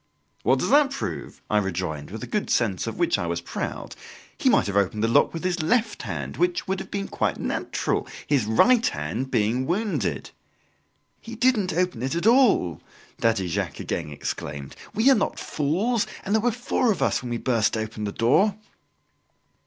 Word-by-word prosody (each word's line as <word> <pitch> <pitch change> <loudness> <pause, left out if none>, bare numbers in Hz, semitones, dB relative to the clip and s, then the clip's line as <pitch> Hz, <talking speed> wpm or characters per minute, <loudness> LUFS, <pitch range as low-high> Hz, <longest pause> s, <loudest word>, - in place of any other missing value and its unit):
"What - - +3
does - - -1
that 290 -1 +6
prove?" 275 0 -5
I 105 - +2
rejoined 90 -6 -3
with 110 +2 -7
a - - -3
good 210 - -2
sense 105 -6 +1
of - - -4
which - - +2
I 85 - -2
was 85 0 -1
proud; 85 - -5 0.4
"he - - +2
might - - +4
have 100 0 -3
opened 100 +2 +1
the - - +3
lock 115 - +4
with 165 - -6
his 185 -1 0
left 225 +7 +1
hand, - - -5
which 355 -5 0
would 190 0 -1
have - - -7
been 200 -1 -3
quite - - -1
natural, - - -2 0.2
his 140 -7 +2
right 230 - +4
hand 85 - -3
being 120 +2 +1
wounded." 205 +5 -1 0.9
"He 230 0 -9
didn't 230 -5 +2
open 180 -7 0
it 130 +3 -1
at 170 +2 -1
all!" 225 - +4 0.4
Daddy 110 -5 +1
Jacques 85 - -3
again 80 -3 -3
exclaimed. 70 -1 -5 0.2
"We 220 +5 +2
are - - +6
not 210 - -1
fools; 195 +11 0 0.2
and 200 - -1
there 220 - +3
were 245 +2 +2
four 245 0 +1
of 200 - -1
us - - +1
when 125 - -6
we 120 - -1
burst 115 -3 +1
open 110 -1 -4
the 100 - -2
door!" 165 - +3
140 Hz, 190 wpm, -25 LUFS, -, 0.9 s, that